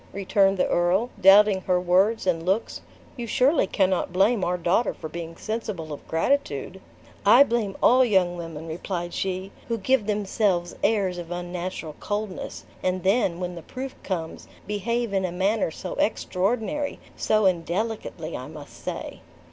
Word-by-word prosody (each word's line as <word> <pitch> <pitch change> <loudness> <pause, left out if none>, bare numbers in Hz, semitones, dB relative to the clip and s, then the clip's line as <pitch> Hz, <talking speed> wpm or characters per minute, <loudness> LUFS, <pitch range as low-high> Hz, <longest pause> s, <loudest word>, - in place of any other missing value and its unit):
returned 195 0 +2
the - - +2
earl, 185 +8 +1
doubting 195 0 +7
her 180 -1 +1
words 190 +5 +2
and 165 -3 +1
looks; 190 +6 -1 0.4
"you 240 -1 -4
surely 260 - +3
cannot 185 -2 +1
blame 195 +3 +3
our 180 +1 0
daughter 175 +7 +1
for - - -7
being 165 +1 -7
sensible 215 -8 -4
of 145 - -10
gratitude." 180 - -1 0.4
"I 235 +7 +8
blame 230 -7 -1
all 255 +1 +6
young 190 -7 +2
women," 165 -2 -7
replied 175 +1 -4
she, 190 0 -3 0.2
"who 230 - -1
give 225 +1 +1
themselves 200 -4 0
airs 195 -5 +1
of 170 -1 -7
unnatural 175 -2 -5
coldness; 205 -2 -4 0.2
and 185 0 -1
then, 190 -3 +2
when 180 -1 -3
the 170 - -8
proof 260 +10 -6
comes, 165 -4 -4 0.2
behave 220 +2 -2
in 190 -1 +1
a 180 - -1
manner 195 +4 +1
so 180 +3 -6
extraordinary, 225 +9 0 0.2
so 215 -1 +2
indelicately, 180 -1 -1
I 130 - -6
must 150 -1 -12
say." - - -5
190 Hz, 155 wpm, -25 LUFS, 175-215 Hz, 0.4 s, I